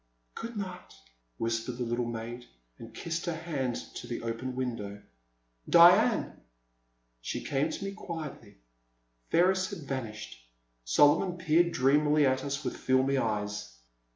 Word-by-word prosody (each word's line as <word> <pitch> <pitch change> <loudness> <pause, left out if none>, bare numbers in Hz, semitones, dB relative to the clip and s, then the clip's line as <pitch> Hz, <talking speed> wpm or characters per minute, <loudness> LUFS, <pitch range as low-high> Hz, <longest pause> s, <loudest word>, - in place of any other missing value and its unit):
*' - - -45
Good 230 -1 -6
night,*' 185 - -6 0.4
whispered 115 +1 -2
the 125 - -2
little 120 0 -1
maid, 120 +1 -6 0.3
and - - -10
kissed 165 +1 -4
her 170 - -1
hand 145 -7 -2 0.2
to 120 - -7
the 120 0 -5
open 115 +3 -4
window. 115 -6 -4 0.7
Diane! - - +6 0.8
She - - -4
came 140 +3 0
to 160 - -5
me 195 - -3
quietly. 160 - -8 0.7
Ferris 185 +2 +3
had 160 - -7
vanished; 110 - -5 0.4
Solomon 145 - +4
peered 170 +1 +3
dreamily 150 +1 +3
at 130 0 +1
us 140 +1 -3
with - - -3
filmy 130 +1 +2
eyes. 105 - -3
130 Hz, 135 wpm, -30 LUFS, 115-165 Hz, 0.8 s, Diane